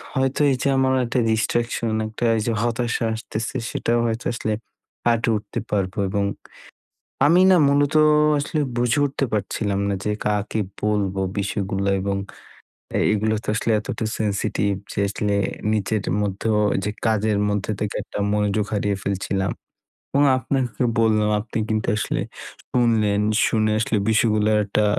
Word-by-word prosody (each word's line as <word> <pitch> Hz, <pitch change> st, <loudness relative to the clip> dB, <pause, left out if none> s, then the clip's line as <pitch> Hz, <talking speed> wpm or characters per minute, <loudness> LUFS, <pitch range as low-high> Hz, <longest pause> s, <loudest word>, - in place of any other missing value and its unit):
হয়তো 130 Hz, 0 st, 0 dB
এই 130 Hz, -, +2 dB
যে -, -, +1 dB
আমার 130 Hz, 0 st, +3 dB
একটা 125 Hz, +2 st, 0 dB
distraction 115 Hz, +1 st, 0 dB, 0.2 s
একটা 110 Hz, +2 st, -4 dB
এই -, -, 0 dB
যে 115 Hz, -, +1 dB
হতাশা 120 Hz, 0 st, -1 dB
আসতেছে 110 Hz, +2 st, -4 dB
সেটাও 120 Hz, +1 st, 0 dB
হয়তো 115 Hz, +2 st, -3 dB
আসলে 110 Hz, -2 st, -2 dB, 0.5 s
কাঁটিয়ে 115 Hz, -1 st, +2 dB
উঠতে 105 Hz, +3 st, -5 dB
পারবো 100 Hz, -2 st, -1 dB
এবং 100 Hz, 0 st, 0 dB, 1.0 s
আমি 170 Hz, +5 st, +5 dB
না 185 Hz, -, +6 dB
মূলত 145 Hz, +1 st, +2 dB, 0.4 s
আসলে 150 Hz, +2 st, -1 dB, 0.2 s
বুঝে 120 Hz, +3 st, +2 dB
উঠতে 140 Hz, 0 st, -2 dB
পারছিলাম 100 Hz, -1 st, -1 dB
না 100 Hz, -, 0 dB
যে 105 Hz, -, 0 dB
কাকে 105 Hz, +1 st, 0 dB, 0.2 s
বলবো 100 Hz, -2 st, 0 dB, 0.2 s
বিষয়গুলো 100 Hz, 0 st, -1 dB
এবং 100 Hz, +1 st, -1 dB, 0.8 s
এ -, -, +2 dB
এগুলো 110 Hz, +1 st, +1 dB
তো -, -, -13 dB
আসলে 115 Hz, -, 0 dB
এতটা 110 Hz, +1 st, -4 dB
সেনসিটিভ 100 Hz, -1 st, 0 dB, 0.2 s
যে -, -, -3 dB
আসলে 105 Hz, 0 st, -1 dB, 0.4 s
নিজের 105 Hz, 0 st, -1 dB, 0.2 s
মধ্যে 100 Hz, +2 st, -2 dB, 0.4 s
যে 105 Hz, -, -1 dB
কাজের 110 Hz, -1 st, +2 dB
মধ্যে 105 Hz, +1 st, -1 dB
থেকে 105 Hz, -1 st, -3 dB
একটা -, -, -8 dB, 0.2 s
মনোযোগ 105 Hz, 0 st, +1 dB
হারিয়ে 100 Hz, -1 st, 0 dB
ফেলছিলাম 95 Hz, -1 st, -1 dB, 0.6 s
এবং 140 Hz, +1 st, +3 dB
আপনাকে 130 Hz, -1 st, -1 dB, 0.2 s
বললাম 110 Hz, -2 st, +3 dB
আপনি 115 Hz, -, -6 dB
কিন্তু 110 Hz, 0 st, -1 dB
আসলে 105 Hz, -, -1 dB, 0.5 s
শুনলেন, 110 Hz, -4 st, +2 dB, 0.3 s
শুনে 110 Hz, -1 st, +1 dB
আসলে 110 Hz, -1 st, 0 dB
বিষয়গুলার 110 Hz, -1 st, +3 dB
একটা 105 Hz, +1 st, +1 dB
110 Hz, 145 wpm, -22 LUFS, 100-115 Hz, 1.0 s, না